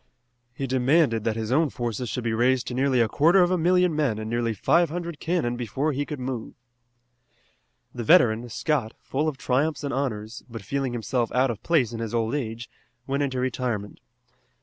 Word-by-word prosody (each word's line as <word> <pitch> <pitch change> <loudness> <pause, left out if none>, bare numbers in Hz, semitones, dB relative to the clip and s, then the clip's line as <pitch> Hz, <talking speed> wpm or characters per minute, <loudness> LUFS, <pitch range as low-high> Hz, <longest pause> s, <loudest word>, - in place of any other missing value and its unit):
He 135 - -3
demanded 130 -2 +2
that 110 - 0
his 110 0 -3
own 155 +3 +3
forces 120 -1 -3
should 125 +3 -3
be 115 -1 -1
raised 125 +2 +2
to - - -5
nearly 130 -1 +2
a 115 - +3
quarter 170 - +4
of 175 - +1
a - - +3
million 180 0 +3
men 140 -8 +1
and 110 0 -5
nearly 115 0 0
five 170 - +3
hundred 170 -1 -5
cannon 165 -8 0
before 130 +6 -1
he 145 +1 -2
could 150 -3 -5
move. 125 -3 -5 1.4
The 120 - -4
veteran, 115 +1 +4
Scott, 125 -1 -1
full 150 +4 -1
of 150 -4 -2
triumphs 135 +2 0
and 140 - -2
honors, 120 -4 -3
but 115 -3 -8
feeling 135 +3 -2
himself 120 0 -1
out 130 +1 +3
of 110 - -7
place 140 -9 +1
in 115 - -5
his 115 0 -3
old 115 0 0
age, 115 -4 -3 0.4
went 140 +1 -1
into 130 -3 -1
retirement. 120 -5 -2
125 Hz, 195 wpm, -25 LUFS, 115-145 Hz, 1.4 s, quarter